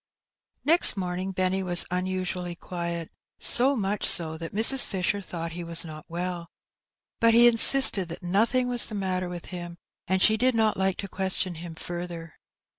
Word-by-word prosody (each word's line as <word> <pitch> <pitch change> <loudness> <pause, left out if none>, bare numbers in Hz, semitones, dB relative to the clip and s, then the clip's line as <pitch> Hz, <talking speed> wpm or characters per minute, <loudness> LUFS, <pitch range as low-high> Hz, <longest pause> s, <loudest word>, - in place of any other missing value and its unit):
Next 330 -8 +4
morning 185 0 -4
Benny 185 0 -2
was 175 -2 +3
nnasually 180 -1 -4
qniet^ 170 -2 -6 0.3
so 265 +3 +3
mnch 205 -1 -3
so 160 -2 +2
thai 165 0 -8
Mrs. 225 +6 +5
Fisher 190 +1 -3
thoaght 170 -4 -7
he 175 +1 -7
was 170 +1 +3
not 155 -1 -11
well; 175 0 -6 0.7
bnt 230 0 +4
he 240 +1 +6
insisted 230 -5 +6
that 170 +3 -9
nothing 230 +8 0
was 245 -1 +3
the 215 - -8
matter 185 -2 -4
with 175 -1 -9
him^ 175 -1 -8 0.3
and 190 +1 0
she 220 +3 +3
did 255 +1 0
not 220 -1 0
like 190 -1 -2
to 200 - -7
question 190 -1 -2
him 165 0 -10
further. 170 -1 -8
185 Hz, 170 wpm, -25 LUFS, 175-210 Hz, 0.7 s, he